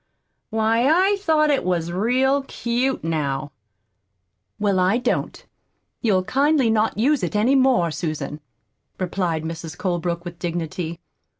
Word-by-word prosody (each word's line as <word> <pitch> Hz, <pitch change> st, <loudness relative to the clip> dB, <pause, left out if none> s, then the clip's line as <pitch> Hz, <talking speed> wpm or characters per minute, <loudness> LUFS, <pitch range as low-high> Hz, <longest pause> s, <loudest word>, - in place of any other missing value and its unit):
Why, 225 Hz, +2 st, +2 dB
I 375 Hz, +6 st, +4 dB
thought 310 Hz, -5 st, +3 dB
it 280 Hz, -, +1 dB
was 170 Hz, -2 st, -1 dB
real 255 Hz, +9 st, +2 dB
cute, 255 Hz, 0 st, -2 dB
now." 145 Hz, -4 st, -2 dB, 1.1 s
"Well, 205 Hz, -3 st, +1 dB
I 185 Hz, +5 st, +3 dB
don't. 250 Hz, 0 st, -2 dB, 0.6 s
You'll 195 Hz, -6 st, +2 dB
kindly 275 Hz, +2 st, +2 dB
not 220 Hz, -1 st, +1 dB
use 275 Hz, +5 st, +2 dB
it -, -, -3 dB
any 220 Hz, +6 st, +3 dB
more, 255 Hz, -11 st, +3 dB
Susan," 155 Hz, -2 st, -4 dB, 0.6 s
replied 175 Hz, -3 st, -1 dB
Mrs. 165 Hz, 0 st, -6 dB
Colebrook, 175 Hz, -2 st, -2 dB
with 175 Hz, 0 st, -8 dB
dignity. 170 Hz, -1 st, -4 dB
205 Hz, 125 wpm, -22 LUFS, 170-260 Hz, 1.1 s, I